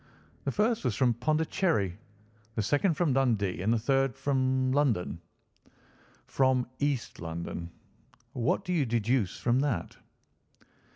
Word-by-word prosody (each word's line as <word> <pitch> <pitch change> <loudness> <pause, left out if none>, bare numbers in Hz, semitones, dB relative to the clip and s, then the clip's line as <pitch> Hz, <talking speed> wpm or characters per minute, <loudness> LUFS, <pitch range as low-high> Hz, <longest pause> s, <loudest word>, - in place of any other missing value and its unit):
"The - - 0
first 220 +2 +1
was 125 -6 0
from 120 +3 +3
Pondicherry, 155 - 0 0.6
the 110 - 0
second 150 - +2
from 155 -3 +1
Dundee, 110 -9 +1
and 105 +4 +1
the 120 - +3
third 135 +2 +1
from 130 -1 +1
London." 125 - +1 1.0
"From 130 -2 +2
East 140 -4 -1
London. 85 0 -5 0.6
What 125 +10 0
do 180 - -1
you 150 -7 +1
deduce 115 -2 0
from 120 +1 +1
that?" 140 -4 -2
130 Hz, 125 wpm, -29 LUFS, 110-145 Hz, 1.0 s, from